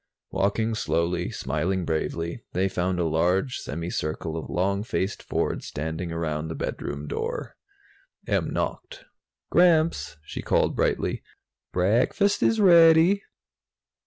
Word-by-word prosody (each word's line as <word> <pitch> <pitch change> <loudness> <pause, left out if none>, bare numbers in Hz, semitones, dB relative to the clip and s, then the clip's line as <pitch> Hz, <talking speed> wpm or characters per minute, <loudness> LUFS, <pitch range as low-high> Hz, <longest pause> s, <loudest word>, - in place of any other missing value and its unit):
Walking 110 +3 0
slowly, 85 -4 0
smiling 85 +7 -2
bravely, 85 +5 -2
they 95 +2 +1
found 90 -1 -1
a 85 - +1
large 90 - +1
semi 85 +4 -5
circle 80 +1 -3
of 80 - -5
long 100 +3 0
faced 100 -2 -2
Fords - - -2
standing 80 +3 -4
around 80 -2 -2
the 80 - -5
bedroom 70 +1 -4
door. - - -4 0.7
Em - - 0
knocked. - - -4 0.5
"Gramps," 165 - +3
she 75 - -6
called - - +1
brightly, - - 0 0.5
"break 100 +7 +2
fast 200 0 +2
is 225 - +3
rea 170 -5 +8
dy." 175 +5 +4
90 Hz, 130 wpm, -25 LUFS, 80-115 Hz, 0.7 s, rea